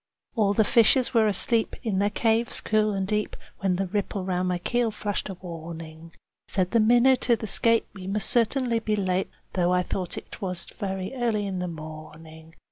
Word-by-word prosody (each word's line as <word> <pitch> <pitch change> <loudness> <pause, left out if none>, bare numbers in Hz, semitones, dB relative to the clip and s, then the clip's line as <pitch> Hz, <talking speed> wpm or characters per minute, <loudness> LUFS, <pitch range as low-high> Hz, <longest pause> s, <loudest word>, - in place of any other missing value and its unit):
All 205 -3 +2
the 220 - +5
fishes 235 +3 +4
were 225 -2 +4
asleep 220 +3 +2
in 205 -5 0
their 205 +1 +2
caves 225 +2 +1
cool 215 0 +1
and 195 -1 -1
deep, 210 0 -1 0.2
When 190 -2 +1
the 195 +2 -1
ripple 195 0 -3
round 185 -1 -1
my 180 -1 0
keel 240 +6 0
flashed 205 -1 -4
a 190 - -5
warning. 165 -2 -9 0.4
Said 185 -2 -1
the 230 - +3
minnow 240 +4 +5
to 240 -1 +2
the 220 - -6
skate, 230 +2 +3
"We 190 -2 -9
must 205 +2 +1
certainly 240 0 +2
be 215 -1 -1
late, 190 -2 0 0.2
Though 180 -1 +1
I 180 0 +2
thought 180 -1 -3
't - - -9
was 180 -3 -2
very 190 +1 -5
early 230 -5 0
in 190 -2 -3
the 180 - -2
morning." 160 0 -10
195 Hz, 195 wpm, -26 LUFS, 180-225 Hz, 0.4 s, the